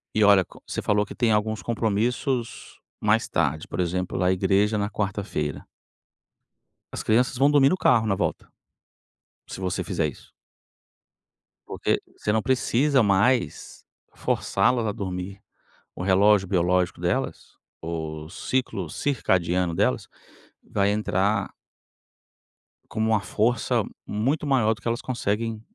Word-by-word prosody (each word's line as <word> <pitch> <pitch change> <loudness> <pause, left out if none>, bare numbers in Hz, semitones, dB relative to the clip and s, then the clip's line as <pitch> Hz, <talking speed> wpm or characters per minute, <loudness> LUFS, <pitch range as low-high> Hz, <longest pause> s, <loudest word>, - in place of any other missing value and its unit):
E 110 - +4
olha 100 -2 +6
co - - -17
você - - -3
falou 105 0 +1
que - - -10
tem 120 -2 +2
alguns 110 0 0
compromissos 115 +2 -2 0.2
mais - - +2
tarde, 75 +3 -1
por - - -6
exemplo, 90 +1 -1
lá 90 - +1
a - - +4
igreja 100 +3 +2
na 100 0 -1
quarta-feira. 100 -7 -3 1.2
As - - -5
crianças 125 +3 +2
vão 140 +3 +4
dormir 140 -2 +5
no 185 - +1
carro 115 -9 +3
na 100 - +2
volta, - - -2 1.0
se - - -7
você 95 0 -2
fizer 85 -3 -1
isso. 70 - -12 1.4
Porque - - -1 0.2
você 105 - -1
não 110 +1 +2
precisa 130 +2 +2
mais 105 +5 +1 0.3
forçá-las 110 +4 +1
a 105 - -1
dormir. 95 0 -5 0.5
O - - -5
relógio 100 +1 +4
biológico 90 -1 +1
delas, - - -2 0.2
o 80 -2 -5
ciclo 100 -2 -2
circadiano 90 - 0
delas, 65 -6 0 0.6
vai 100 0 0
entrar 100 -1 0 1.4
com 110 - -6
uma 110 -1 +3
força 110 +3 0 0.2
muito 130 +9 -1
maior 120 -6 +3
do 110 - -14
que - - -6
elas 115 +1 -1
conseguem 115 -2 -2
105 Hz, 135 wpm, -25 LUFS, 95-115 Hz, 1.4 s, olha